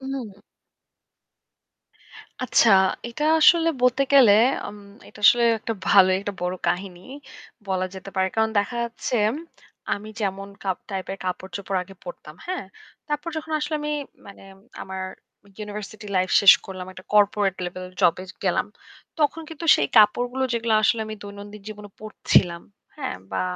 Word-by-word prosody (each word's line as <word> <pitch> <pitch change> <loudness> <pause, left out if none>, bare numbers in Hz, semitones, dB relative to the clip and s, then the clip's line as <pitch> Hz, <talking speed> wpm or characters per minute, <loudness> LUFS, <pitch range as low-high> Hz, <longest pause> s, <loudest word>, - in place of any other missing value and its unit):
হুম। 265 -4 -5 2.2
আচ্ছা, 235 -2 +4 0.4
এটা 265 +6 -4 0.2
আসলে 330 +1 +6
বলতে 250 +2 +3
গেলে 260 -7 +7 0.3
আম 210 - -9 0.3
এটা - - -15
আসলে 240 +2 +6
একটা 225 - -4
ভালোই 185 -2 +6
একটা 205 +1 -4
বড় 180 +1 -1
কাহিনী 180 0 -3 0.7
বলা 185 -1 -1
যেতে 190 +1 -9
পারে। 190 0 +2
কারণ 220 0 +2
দেখা 205 +4 -1
যাচ্ছে 235 +1 -3 0.2
ম - - -4 0.6
আমি 210 +1 -9
যেমন 195 -1 -3
কাপ 190 -2 -2
টাইপের 195 0 -4
কাপড়-চোপড় 190 +1 -3
আগে 195 +2 -14
পড়তাম। 160 -3 -10
হ্যাঁ? 365 - -4 0.4
তারপর 295 +2 -3
যখন 315 0 -5
আসলে 300 +1 -3
আমি 295 0 -3 0.4
মানে 200 - -13 0.4
আমার 190 0 -6 0.6
ইউনিভার্সিটি 210 0 -7
লাইফ 185 0 +1
শেষ 200 - +10
করলাম। 185 -1 -7
একটা 185 0 -13
কর্পোরেট 205 -2 +3
লেভেল 185 +1 -6
জব 165 - +5
এ - - -8 0.2
গেলাম। 185 +1 +1 0.5
তখন 300 +1 +1
কিন্তু 320 +1 -8
সেই 145 - +1
কাপড়গুলো 245 +5 +4
যেগুলো 230 -1 0
আসলে 225 +1 +2
আমি 215 - -6
দৈনন্দিন 205 0 -10
জীবনে 210 -1 -9
পড়ছিলাম। 180 -5 +1 0.3
হ্যাঁ? - - -4
বা 95 -1 -1
205 Hz, 145 wpm, -23 LUFS, 190-235 Hz, 2.2 s, শেষ